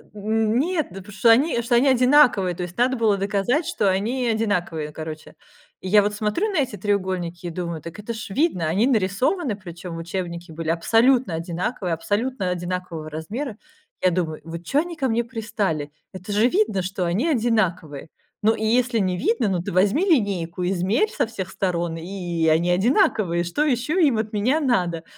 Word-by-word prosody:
Н 220 Hz, +2 st, 0 dB
нет! 330 Hz, +1 st, 0 dB
Да 195 Hz, +2 st, -8 dB
потому 210 Hz, +2 st, -12 dB
что 210 Hz, +4 st, +3 dB
они 240 Hz, 0 st, +3 dB
одинаковые, 250 Hz, -, +4 dB
то 180 Hz, -, -4 dB
есть 175 Hz, 0 st, -7 dB
надо 255 Hz, +1 st, +2 dB
было 220 Hz, -3 st, +3 dB
доказать, 205 Hz, -, 0 dB
что 210 Hz, -, +1 dB
они 235 Hz, +7 st, -1 dB
одинаковые, 180 Hz, -9 st, -1 dB
короче. 155 Hz, 0 st, -8 dB, 0.5 s
И 185 Hz, -, -6 dB
я 210 Hz, +2 st, +6 dB
вот 205 Hz, +1 st, -1 dB
смотрю 215 Hz, -, -1 dB
на 365 Hz, -, 0 dB
эти 250 Hz, -6 st, -3 dB
треугольники 185 Hz, -3 st, -2 dB
и -, -, -3 dB
думаю: 170 Hz, -1 st, -4 dB
"Так 170 Hz, +5 st, -9 dB
это 210 Hz, +3 st, -5 dB
ж 220 Hz, -2 st, -7 dB
видно". 275 Hz, -, +1 dB
Они 200 Hz, +10 st, +2 dB
нарисованы 230 Hz, -, +1 dB
причем 175 Hz, -3 st, -8 dB
учебники 170 Hz, 0 st, -5 dB
были 160 Hz, 0 st, -5 dB
абсолютно 225 Hz, +4 st, +3 dB
одинаковые, 175 Hz, +2 st, -3 dB
абсолютно 205 Hz, +4 st, -1 dB
одинакового 175 Hz, -3 st, -4 dB
размера. 210 Hz, -, -5 dB, 0.4 s
Я 185 Hz, -, +4 dB
думаю: 165 Hz, -3 st, -2 dB
вот 165 Hz, +1 st, -7 dB
чё 275 Hz, -, +2 dB
они 340 Hz, +2 st, -3 dB
ко 265 Hz, -5 st, -1 dB
мне 235 Hz, +1 st, +1 dB
пристали? 210 Hz, -, -3 dB, 0.2 s
Это 185 Hz, +2 st, -8 dB
же 215 Hz, +4 st, +4 dB
видно, 355 Hz, -, +1 dB
что 185 Hz, 0 st, -3 dB
они 195 Hz, -, 0 dB
одинаковые. 215 Hz, -, 0 dB, 0.4 s
Ну, 220 Hz, +1 st, +4 dB
и 220 Hz, -, -3 dB
если 240 Hz, +1 st, +2 dB
не 185 Hz, -2 st, 0 dB
видно, 230 Hz, +3 st, +1 dB
ну, 180 Hz, -3 st, 0 dB
ты -, -, -5 dB
возьми 200 Hz, -, +2 dB
линейку, 190 Hz, -, 0 dB
измерь 195 Hz, -, +1 dB
со 265 Hz, -, 0 dB
всех 195 Hz, -5 st, -6 dB
сторон, 175 Hz, -4 st, -2 dB
и 175 Hz, -2 st, -3 dB
они 165 Hz, +3 st, +3 dB
одинаковые. 200 Hz, -, +2 dB
Что 175 Hz, -, -1 dB
еще 295 Hz, +6 st, +1 dB
им 250 Hz, -6 st, +2 dB
от 220 Hz, 0 st, -3 dB
меня 250 Hz, +10 st, +2 dB
надо? 180 Hz, -, 0 dB
200 Hz, 180 wpm, -23 LUFS, 175-240 Hz, 0.5 s, я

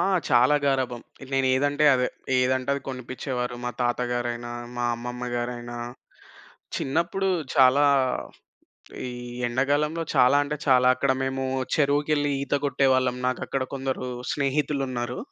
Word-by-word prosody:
ఆ! -, -, +3 dB, 0.3 s
చాలా 125 Hz, +3 st, +5 dB
గారాబం. 130 Hz, -3 st, 0 dB, 0.3 s
నేనెదంటే 135 Hz, +3 st, +2 dB
అదే. 125 Hz, -1 st, +1 dB, 0.3 s
ఏదంటే 130 Hz, +1 st, +1 dB
అది 140 Hz, -, -3 dB
కొనిపిచ్చేవారు. 125 Hz, -1 st, -4 dB
మా 125 Hz, -, -1 dB
తాతగారైన, 120 Hz, -1 st, -1 dB, 0.3 s
మా 120 Hz, -, -1 dB
అమ్మమ్మ‌గారైన. 120 Hz, 0 st, -4 dB, 1.0 s
చిన్నప్పుడు 170 Hz, +7 st, 0 dB, 0.3 s
చాలా 135 Hz, +2 st, +6 dB, 1.2 s
ఈ -, -, -4 dB, 0.4 s
ఎండాగాలంలో 145 Hz, +6 st, 0 dB
చాలా 125 Hz, +3 st, +5 dB
అంటే 150 Hz, +1 st, -3 dB
చాలా 130 Hz, -2 st, +5 dB
అక్కడ 135 Hz, +1 st, +1 dB
మేము 135 Hz, 0 st, -2 dB, 0.3 s
చెరువుకెళ్ళి 145 Hz, 0 st, +2 dB
ఈత 140 Hz, -, -2 dB
కొట్టేవాళ్ళం. 130 Hz, -2 st, +2 dB
నాకక్కడ 130 Hz, +1 st, -2 dB
కొందరు 130 Hz, -1 st, -3 dB, 0.2 s
స్నేహితులున్నారు. 135 Hz, -3 st, -1 dB
130 Hz, 105 wpm, -25 LUFS, 125-140 Hz, 1.2 s, చాలా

